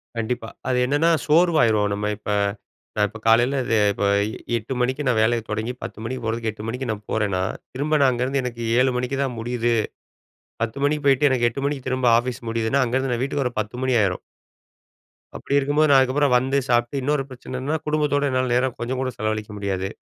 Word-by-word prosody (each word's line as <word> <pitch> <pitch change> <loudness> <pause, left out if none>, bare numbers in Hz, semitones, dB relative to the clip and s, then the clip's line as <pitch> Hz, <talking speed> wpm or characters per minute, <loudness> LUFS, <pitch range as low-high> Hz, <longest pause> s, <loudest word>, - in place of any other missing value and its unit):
கண்டிப்பா. 115 0 -3 0.2
அது 125 -1 +1
என்னன்னா, 145 +5 +2 0.2
சோர்வயிருவோம் 150 - +3
நம்ம 105 +1 -2
இப்ப 105 - -5 0.7
நான் 105 0 +3
இப்ப 110 +1 -11
காலையில 120 +4 +4 0.2
அ - - +4 0.2
இப்ப 100 - -2 0.5
8 115 +4 -5
மணிக்கு 130 +4 0
நான் 120 -3 +2
வேலைய 115 +1 +2
தொடங்கி 110 +3 -2
10 - - -7
மணிக்கு 125 +2 -4
போறதுக்கு 115 0 -2
8 105 0 -10
மணிக்கு 125 +2 -4
நான் 105 0 -6
போறேன்னா, 100 -4 0 0.3
திரும்ப 150 +4 0
நான் 135 - +6
அங்கேருந்து 130 +3 -1
எனக்கு 120 -1 -5 0.2
7 130 0 +4
மணிக்கு 125 +2 -2
தான் 125 -3 -3
முடியுது. 120 0 0 0.9
10 115 +4 -4
மணிக்கு 150 0 0
போய்ட்டு 140 +1 +4
எனக்கு 120 -2 +2
8 135 +4 -6
மணிக்கு 140 -3 -3
திரும்ப 130 -1 0
ஆஃபீஸ் 125 0 -2
முடியுதுன்னா 115 +4 +1
அங்கேருந்து 130 +1 0
நான் 120 - -2
வீட்டுக்கு 140 0 -1
வர 125 - -1
10 110 +3 -8
மணி 130 -1 +1
ஆயிரும். 95 -3 0 1.1
அப்டி 140 - -5
இருக்கும்போது, 145 +3 +2
நான் 140 - +7
அதுக்கப்புறம் 130 +1 +2
வந்து 135 +2 0
சாப்புட்டு 120 +3 +1
இன்னொரு 145 +1 0
பிரச்சனன்னா 130 +3 -4
குடும்பத்தோட 145 -2 +1
என்னால 130 -1 0
நேரம் 125 0 +1
கொஞ்சம் 125 +2 -3
கூட 130 - -1
செலவழிக்க 110 0 -2
முடியாது. 95 -1 -2
125 Hz, 185 wpm, -23 LUFS, 115-135 Hz, 1.1 s, நான்